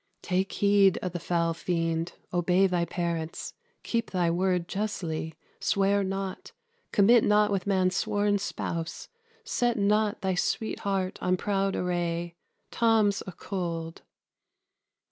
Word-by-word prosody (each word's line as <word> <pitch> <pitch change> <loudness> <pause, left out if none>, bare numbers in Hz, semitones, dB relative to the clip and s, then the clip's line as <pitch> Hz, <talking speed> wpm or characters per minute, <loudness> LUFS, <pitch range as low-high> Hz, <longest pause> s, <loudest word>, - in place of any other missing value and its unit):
_ - - -50
Take 190 +1 0
heed 200 -2 +4
o' 180 - -1
the 175 0 -5
foul 170 -1 0
fiend: 165 0 -1 0.2
obey 180 +2 +3
thy 180 -2 +1
parents; 170 -2 -3 0.3
keep 230 -1 -1
thy 175 -3 +1
word 180 0 +1
justly; 170 -7 -3 0.2
swear 200 0 +2
not; 195 0 -4 0.4
commit 220 +3 +5
not 210 0 +4
with 195 -1 -1
man's 185 -1 +2
sworn 205 -1 +1
spouse; 170 -4 -4 0.3
set 245 - 0
not 210 +1 +2
thy 190 -2 0
sweet 215 +4 -1
heart 195 -2 -2
on 180 0 +1
proud 195 0 0
array: 175 -1 -1 0.4
Tom's 220 -3 +3
a - - -4
cold. 170 -3 -5
190 Hz, 130 wpm, -28 LUFS, 175-205 Hz, 0.4 s, commit